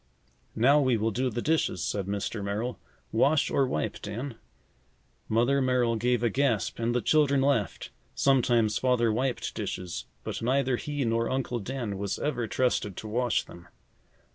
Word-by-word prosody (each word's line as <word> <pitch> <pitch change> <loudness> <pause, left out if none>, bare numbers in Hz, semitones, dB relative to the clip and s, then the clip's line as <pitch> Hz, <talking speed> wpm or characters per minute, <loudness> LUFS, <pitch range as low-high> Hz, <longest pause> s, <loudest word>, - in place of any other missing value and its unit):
"Now, 135 +6 +5
we 130 -4 +2
will 110 +1 0
do 130 +4 0
the 120 0 -4
dishes," 155 - +1
said 100 -2 -2
Mr. 100 +1 -3
Merrill. 110 +5 -3 0.3
"Wash 140 +7 +3
or 135 - +2
wipe, 75 - -2
Dan?" 120 +6 -5 1.0
Mother 120 +5 +3
Merrill 125 -3 +2
gave 120 +1 +1
a 120 - +3
gasp 120 -6 0
and 115 +1 0
the 125 - +1
children 145 -3 +3
laughed. 135 -7 0 0.2
Sometimes, 120 -5 +3
Father 120 -3 +2
wiped 125 +2 -1
dishes, 90 -2 -4 0.2
but - - -4
neither 130 +1 +1
he 145 -1 -3
nor 115 0 +1
Uncle 130 -2 -1
Dan 115 -3 -4
was 100 -1 -2
ever 125 -6 -2
trusted 105 -6 0
to 110 - -6
wash 120 +1 +1
them. 85 0 -14
120 Hz, 160 wpm, -28 LUFS, 110-130 Hz, 1.0 s, Now